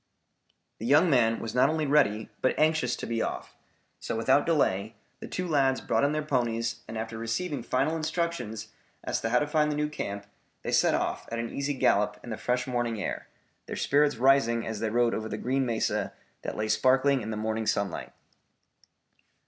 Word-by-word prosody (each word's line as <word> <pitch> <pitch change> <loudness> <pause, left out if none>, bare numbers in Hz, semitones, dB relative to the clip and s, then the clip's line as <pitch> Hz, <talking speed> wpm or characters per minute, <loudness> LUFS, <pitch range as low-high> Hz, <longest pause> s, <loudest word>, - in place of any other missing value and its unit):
The 115 - -4
young 155 +6 +5
man 115 -4 +3
was 115 - -5
not 125 - +4
only 155 -1 0
ready, 135 -7 +2
but 130 - +1
anxious 155 -6 +2
to - - -6
be 115 -1 -1
off, - - -4 0.5
so 115 - -4
without 140 +7 +3
delay, 110 - +1 0.2
the - - -7
two 180 0 -3
lads 135 -4 +2
brought - - 0
in 145 - +3
their 155 0 -1
ponies 120 -5 -1
and 110 - -6
after 115 0 -5
receiving 130 +6 -2
final 130 +7 0
instructions 160 -9 -3 0.3
as - - -2
to 115 - -1
how 125 - +3
to 150 - +2
find 150 0 +1
the - - -1
new 150 0 0
camp, 100 -8 -5 0.4
they - - -3
set - - +4
off - - -2
at 115 - -2
an 115 0 -3
easy 140 +1 -2
gallop 105 -4 +2
in 120 - -7
the 110 - -3
fresh 125 0 -1
morning 120 -3 -1
air, - - -4 0.4
their - - -5
spirits 145 +1 +2
rising 120 -2 +3
as 110 -2 -4
they 110 - -1
rode 120 +1 +2
over 110 0 -3
the - - -3
green 130 +1 0
mesa 115 -2 -1 0.3
that - - -5
lay 110 0 -1
sparkling 130 +4 +3
in 110 - -5
the 110 - -3
morning 110 0 -2
sunlight. 100 -5 -1
125 Hz, 195 wpm, -28 LUFS, 115-145 Hz, 0.5 s, young